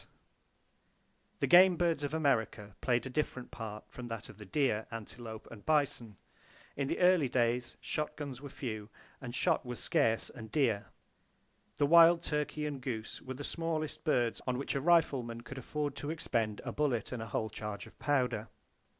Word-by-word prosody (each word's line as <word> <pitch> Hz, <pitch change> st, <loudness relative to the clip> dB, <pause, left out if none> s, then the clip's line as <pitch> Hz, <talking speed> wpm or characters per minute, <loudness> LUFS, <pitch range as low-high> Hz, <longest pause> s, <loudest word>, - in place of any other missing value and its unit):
The -, -, +4 dB
game 180 Hz, 0 st, +7 dB
birds 165 Hz, -4 st, +1 dB
of 145 Hz, -, -1 dB
America 115 Hz, -9 st, 0 dB
played 120 Hz, -1 st, +1 dB
a -, -, -3 dB
different 130 Hz, -3 st, -2 dB
part 110 Hz, -2 st, -6 dB
from 125 Hz, -1 st, -8 dB
that 115 Hz, -2 st, -5 dB
of 100 Hz, -, -13 dB
the 105 Hz, -, -9 dB
deer, 110 Hz, -3 st, +1 dB
antelope 115 Hz, 0 st, -7 dB
and 110 Hz, -3 st, -11 dB
bison. 140 Hz, -9 st, +1 dB, 0.6 s
In 140 Hz, -1 st, -1 dB
the -, -, -1 dB
early 180 Hz, -6 st, +5 dB
days, 120 Hz, 0 st, +1 dB
shotguns 150 Hz, -3 st, -3 dB
were 140 Hz, -, -7 dB
few, 110 Hz, -6 st, -5 dB, 0.3 s
and 120 Hz, -2 st, -6 dB
shot -, -, +2 dB
was 125 Hz, -1 st, -6 dB
scarce 115 Hz, 0 st, +2 dB
and 110 Hz, -3 st, -10 dB
dear. 115 Hz, -9 st, +1 dB, 0.9 s
The 145 Hz, -, +2 dB
wild 170 Hz, +2 st, +7 dB
turkey 150 Hz, 0 st, -1 dB
and 145 Hz, -3 st, -4 dB
goose 115 Hz, -4 st, -4 dB
were 130 Hz, 0 st, -6 dB
the 145 Hz, -, -6 dB
smallest 160 Hz, -1 st, -3 dB
birds 120 Hz, -7 st, +1 dB
on 125 Hz, -1 st, +1 dB
which 140 Hz, -, -2 dB
a 140 Hz, -, -1 dB
rifleman 135 Hz, -8 st, +2 dB
could 130 Hz, +2 st, -8 dB
afford 145 Hz, +2 st, -3 dB
to 145 Hz, -, -4 dB
expend 115 Hz, -10 st, -1 dB
a -, -, -2 dB
bullet 135 Hz, -7 st, 0 dB
and 125 Hz, -3 st, -4 dB
a 110 Hz, -, -5 dB
whole 110 Hz, +1 st, -2 dB
charge 105 Hz, -2 st, -5 dB
of -, -, -17 dB
powder. 125 Hz, -7 st, +1 dB
130 Hz, 175 wpm, -33 LUFS, 115-150 Hz, 0.9 s, game